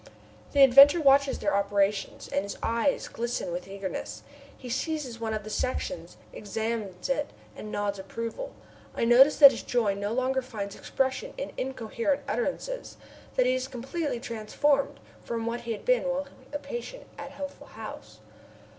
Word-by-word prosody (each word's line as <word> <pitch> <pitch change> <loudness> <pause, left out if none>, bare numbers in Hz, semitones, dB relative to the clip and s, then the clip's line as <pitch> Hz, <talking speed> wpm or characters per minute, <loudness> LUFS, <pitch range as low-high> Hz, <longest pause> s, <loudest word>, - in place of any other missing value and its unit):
The 280 -1 +7
inventor 275 +5 +9
watches 280 -2 +4
their 300 - 0
operations, 200 0 0
and 190 - 0
his 200 +1 -6
eyes 235 +5 +1
glisten 235 -6 -3
with 175 +2 -4
eagerness. 195 -2 -5 0.3
He 255 - -10
seizes 260 -1 -3
one 225 -1 -2
of 215 - -4
the 215 - -7
sections, 255 -5 -3 0.2
examines 210 -3 -3
it, 285 +2 0 0.3
and 215 - -8
nods 205 -1 -2
approval. 230 - -5 0.4
I - - +1
notice 255 +5 +7
that 280 -2 +11
his - - -5
joy 225 -5 +1
no 200 +1 -3
longer 260 +2 +1
finds 210 -6 -6
expression 265 - -2
in - - -4
incoherent 265 +2 -2
utterances, 390 - -3 0.4
that 255 - +4
he 255 - +3
is 255 0 -1
completely 270 +1 -3
transformed 260 +5 0 0.2
from 230 -1 -3
what 235 +1 -2
he 235 -1 -3
was - - -17
while 280 - +2 0.3
a 290 - -2
patient 480 - -7 0.2
at 285 -1 -6
Healthful 280 0 -8
House. - - -10
250 Hz, 155 wpm, -28 LUFS, 215-280 Hz, 0.4 s, that